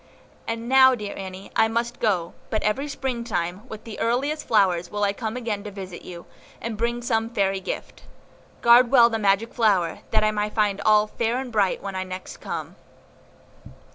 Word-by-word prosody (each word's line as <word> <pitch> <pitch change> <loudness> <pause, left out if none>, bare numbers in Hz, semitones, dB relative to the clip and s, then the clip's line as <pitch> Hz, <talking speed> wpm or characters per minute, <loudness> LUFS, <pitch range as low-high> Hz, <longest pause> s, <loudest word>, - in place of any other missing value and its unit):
And 230 +1 -3
now, 260 0 +6
dear 210 -3 -6
Annie, 190 0 -8
I 220 - +4
must 235 +2 -2
go; 180 -6 0 0.2
but 215 - -1
every 240 +8 0
Springtime, 235 -8 -3
with 220 -1 -8
the 225 - -8
earliest 275 +7 -1
flowers, 185 -5 +2
will 205 +2 -2
I 200 0 +2
come 220 +2 -4
again 220 -5 -3
to - - -4
visit 190 -3 -8
you, 175 -1 -10 0.3
and 230 -1 -4
bring 235 +2 -2
some 225 -1 0
fairy 195 -4 0
gift. 185 - -6 0.6
Guard 240 +1 +7
well 235 -3 +6
the 225 - -1
magic 205 +2 +1
flower, 195 -8 +2
that 215 -1 +2
I 215 - +3
may 210 0 -1
find 210 -2 0
all 215 -1 +4
fair 230 +2 -1
and 260 -1 -5
bright 205 -4 +1
when 195 -1 -4 0.2
next 185 0 -7
I - - -29
come." - - -6
215 Hz, 185 wpm, -24 LUFS, 195-235 Hz, 0.6 s, Guard